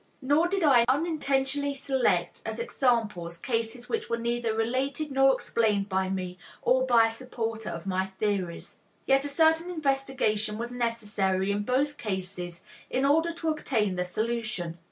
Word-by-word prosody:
Nor 290 +5 +3
did 385 0 -1
I 265 -6 +6
unintentionally 285 -1 +1
select 270 -2 0
as - - -4
examples 225 - 0
cases 230 +3 -3
which 455 -1 -2
were 235 - 0
neither 235 0 -1
related 260 +7 -1
nor 270 0 +5
explained 210 -6 0
by 190 0 0
me 185 -1 -4 0.2
or 260 +1 +3
by 235 -2 +6
a 225 - 0
supporter 225 -2 -4
of 170 +1 -6
my 190 0 0
theories. 195 -5 -2 0.3
Yet 270 +1 +3
a - - -1
certain 320 +3 +3
investigation 270 -9 0
was 235 +2 -4
necessary 205 -5 0
in 205 +1 0
both 270 +6 0
cases 185 -4 -4 0.3
in 260 +2 +1
order 325 +4 +3
to 330 -1 -3
obtain 225 -10 0
the 180 - 0
solution. 215 -3 -2
235 Hz, 155 wpm, -28 LUFS, 205-275 Hz, 0.3 s, I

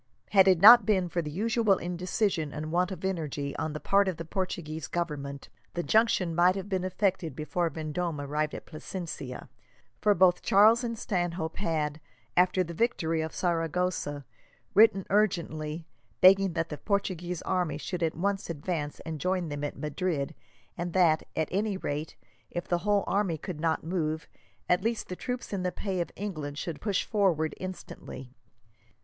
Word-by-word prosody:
Had 195 -2 +6
it 185 -3 +5
not 230 +5 +10
been 190 -4 +1
for 170 - -1
the 150 - -5
usual 215 +3 +2
indecision 180 -2 -1
and 155 +1 -5
want 180 +2 +1
of 190 0 -5
energy 150 -6 -3
on 155 - -2
the 150 - -4
part 200 +3 +3
of 185 -4 -1
the 165 - -6
Portuguese 165 -4 -4
Government, 140 -5 -4 0.3
the 175 - -1
junction 215 -6 +3
might 175 +2 +4
have 195 0 -5
been 190 -2 -1
effected 185 -5 -1
before 165 +3 -1
Vendome 160 +1 -3
arrived 150 +2 -2
at - - -8
Plasencia, 155 -5 -7 0.5
for 210 -1 +4
both 180 0 +4
Charles 220 +5 +5
and 230 -1 -3
Stanhope 175 -5 -2
had, 155 -4 -1 0.3
after 185 +1 +4
the 170 -1 -7
victory 165 -6 0
of 160 0 -3
Saragossa, 165 -4 -1 0.5
written 195 -2 +5
urgently, 165 -6 0 0.3
begging 195 0 +6
that 165 -1 -1
the 150 - -6
Portuguese 180 -3 -2
army 175 -6 0
should 175 +3 -5
at 160 -1 0
once 195 +2 -1
advance 150 -1 -3
and 160 -2 -6
join 180 -2 0
them 145 0 -4
at 145 - -4
Madrid; 150 -1 -2 0.4
and 175 -1 -4
that, 170 -4 +3
at 160 - 0
any 200 +1 0
rate, 150 -3 -4 0.3
if 175 - -5
the 175 - +1
whole 205 +1 +2
army 195 -5 0
could 160 +1 -6
not 160 0 0
move, 160 -2 -2 0.4
at 180 - +3
least 230 +2 -2
the 180 - -4
troops 250 +2 -5
in 195 - -1
the 180 0 -1
pay 190 -2 -2
of 170 - -3
England 155 -8 -5
should 160 -1 -5
push 205 -4 0
forward 180 -8 +1
instantly. 175 -8 -8
175 Hz, 170 wpm, -29 LUFS, 155-190 Hz, 0.5 s, not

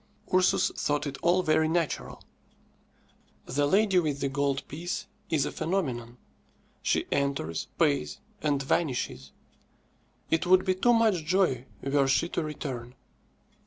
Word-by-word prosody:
Ursus 185 0 +3
thought 145 0 -1
it 135 -2 -5
all 175 +2 +3
very 155 0 +3
natural. 165 -1 -2 1.2
"The 145 +3 0
lady 195 +2 +4
with 150 -4 -1
the 140 - -1
gold 140 0 -1
piece" 170 +5 -4 0.2
is 150 -4 +2
a - - -3
phenomenon. 125 -10 -2 0.6
She - - +1
enters, 140 - -1
pays, 145 -5 +1 0.2
and 145 -2 0
vanishes. 125 - -1 1.0
It 165 +2 +1
would 185 +1 +5
be 185 - +3
too 240 +6 +3
much 220 -7 +3
joy 155 -7 +1 0.2
were 140 0 +2
she 135 +5 +2
to - - -1
return. 130 -5 -5
150 Hz, 130 wpm, -28 LUFS, 135-175 Hz, 1.2 s, would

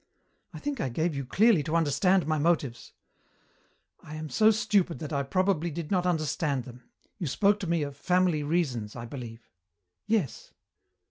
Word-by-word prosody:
I - - -9
think 285 -5 -3
I - - -1
gave 160 +7 -1
you 140 - -3
clearly 215 - +4
to 155 +3 -2
understand 170 +4 +3
my 155 -1 0
motives 145 -7 -1 0.6
" - - -37 0.3
"I 155 - -9
am 155 0 -6
so 215 - +4
stupid 205 -5 +1
that 155 -1 -6
I 140 - +1
probably 175 +3 0
did 165 +1 -6
not 180 -2 +2
understand 155 -4 0
them. 125 0 -13 0.3
You 170 - -2
spoke 205 +8 +2
to 190 - -4
me 170 -2 +1
of 140 -1 -5
'family 180 -3 +1
reasons,' 145 -9 -1
I 115 -1 -6
believe." 115 -2 -9 0.6
"Yes." 210 - -1
160 Hz, 175 wpm, -28 LUFS, 140-185 Hz, 0.6 s, clearly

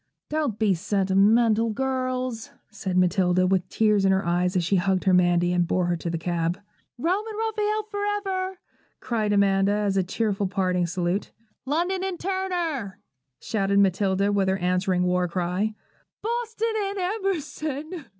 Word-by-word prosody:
'Don't 300 -8 -1
be 215 -3 +3
sentimental, 205 +5 +3
girls' 255 -1 -2 0.2
said 190 -4 -3
Matilda, 185 0 +3
with 185 -1 +1
tears 210 -2 +2
in 195 - +4
her 190 0 +1
eyes, 180 +2 +1
as 180 - +2
she 190 +3 +2
hugged 190 0 +1
her 190 - +3
Mandy, 175 -1 +3
and 175 -1 +1
bore 180 0 +1
her 175 0 +1
to 170 - -4
the 165 - -2
cab. 170 +2 -1 0.4
'Rome 360 - 0
and 435 -1 -6
Raphael 430 -1 -1
for 410 -1 -5
ever!' 385 -2 -2 0.4
cried 220 -4 -1
Amanda, 200 0 +3
as 205 -2 0
a 190 - +3
cheerful 200 +1 -1
parting 185 -2 0
salute. 175 +3 -1 0.4
'London 350 +6 0
and 380 -2 -3
Turner!' 350 - -2 0.4
shouted 200 -2 0
Matilda 195 0 +2
with 200 -2 +1
her 190 - +1
answering 180 0 +1
war 180 0 +1
cry. 180 +5 -1 0.5
'Boston 455 0 -2
and 400 0 -2
Emerson!' 330 -5 -3
205 Hz, 155 wpm, -25 LUFS, -, 0.5 s, in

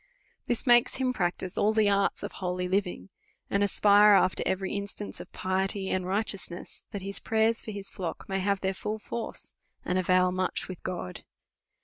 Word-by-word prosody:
This 240 +2 -1
makes 240 -2 +5
him 260 -1 0
practice 180 -3 -2
all 215 +1 +3
the 215 -1 +3
arts 200 -1 +1
of - - -4
holy 180 -1 -3
living, 190 0 -1 0.4
and 200 - +2
as 200 -1 0
pire 205 0 +7
after 185 - +3
every 190 0 -1
instance 200 0 -4
of - - -10
piety 190 +1 -1
and 185 -1 -1
righteousness, 195 -3 -2
that 200 -4 -5
his 200 0 -4
prayers 225 +1 +2
for - - -8
his 200 -2 -5
ilock 175 -4 -5
may 195 0 -1
have 200 0 0
their 190 0 0
full 210 +3 -3
force, 230 +2 -5 0.3
and 180 +1 +1
avail 185 0 +3
much 185 0 -1
with 185 -2 -8
God. 175 - -5
195 Hz, 180 wpm, -28 LUFS, 185-210 Hz, 0.4 s, pire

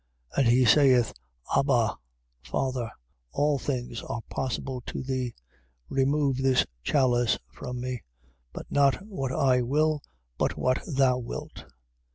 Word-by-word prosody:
14:36. - - +1
And 135 - +4
he 125 +2 +5
saith: 130 -4 +5 0.4
Abba, 125 -6 +3 0.5
Father, 125 - -2 0.4
all 145 -1 +2
things 125 -4 -3
are 115 - -5
possible 130 0 -3
to - - -4
thee: 130 -2 -2 0.5
remove 135 0 +2
this 135 -1 +3 0.2
chalice 120 - +2 0.2
from 125 -1 -6
me; 125 -2 -3 0.5
but - - -7
not 140 +6 +3
what 135 -12 -3
I 130 -1 +3
will, 150 +4 +1 0.4
but - - 0
what 130 +1 +1
thou 130 -4 +3
wilt. 120 - -7
130 Hz, 130 wpm, -27 LUFS, 125-140 Hz, 0.5 s, he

